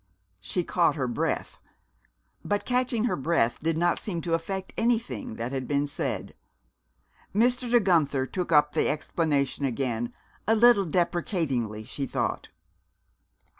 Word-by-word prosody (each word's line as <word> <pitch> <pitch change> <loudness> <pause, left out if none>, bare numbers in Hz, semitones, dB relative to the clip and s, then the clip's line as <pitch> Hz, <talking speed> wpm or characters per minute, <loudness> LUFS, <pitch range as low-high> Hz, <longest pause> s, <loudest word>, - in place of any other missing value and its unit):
She 175 - -2
caught 170 0 +2
her 135 -5 -1
breath. 120 - -2 0.8
But 205 0 -1
catching 250 -2 +1
her 240 - +1
breath 135 -5 +1
did 160 0 0
not 175 +1 +2
seem 180 -5 -4
to 165 +1 -2
affect 190 +3 -3
anything 225 - -1
that 115 +2 -4
had 130 -2 -3
been 145 0 +1
said. 145 - -3 1.0
Mr. 245 +3 +2
De 240 0 +5
Guenther 155 - +2
took 180 +4 -4
up 150 -1 +5
the - - +1
explanation 150 -2 0
again, 120 -3 -1 0.4
a 225 - +4
little 230 -3 +6
deprecatingly, 160 - -1
she 135 +5 -4
thought. - - -2
165 Hz, 135 wpm, -27 LUFS, 135-200 Hz, 1.0 s, little